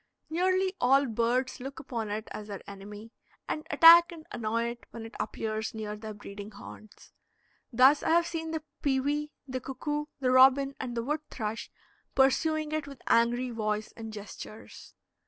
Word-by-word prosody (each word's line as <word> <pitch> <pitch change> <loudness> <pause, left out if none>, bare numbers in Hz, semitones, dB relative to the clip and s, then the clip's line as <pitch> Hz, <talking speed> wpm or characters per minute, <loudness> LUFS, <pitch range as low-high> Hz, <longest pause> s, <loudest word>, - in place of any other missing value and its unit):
Nearly 370 +2 +2
all 270 +3 +5
birds 245 +3 0
look 270 +4 -7
upon 235 -7 -4
it 215 +1 -4
as 210 - -7
their 200 -2 -8
enemy, 205 +3 -10 0.4
and 310 - -4
attack 335 +4 +8
and 320 -2 -11
annoy 230 0 -1
it 235 0 -9
when 225 -1 -8
it 225 - -10
appears 220 +1 -3
near 210 -1 -4
their 215 0 -8
breeding 205 0 -9
haunts. 215 0 -13 0.6
Thus, 260 +4 +6
I - - -1
have 335 +1 +4
seen 325 -1 -4
the 320 -1 -3 0.2
pewee, 290 +2 0 0.2
the 260 0 -3
cuckoo, 295 +3 -3
the 255 -2 +1
robin, 270 +2 +6
and 245 -2 -4
the 230 - -1
wood 300 +4 -1
thrush 220 -1 -4 0.5
pursuing 310 +3 +2
it 310 -2 -2
with 275 -3 -11
angry 240 +2 +2
voice 215 -2 -2
and 225 -1 -7
gestures. 215 +1 -10
255 Hz, 165 wpm, -29 LUFS, 220-295 Hz, 0.6 s, attack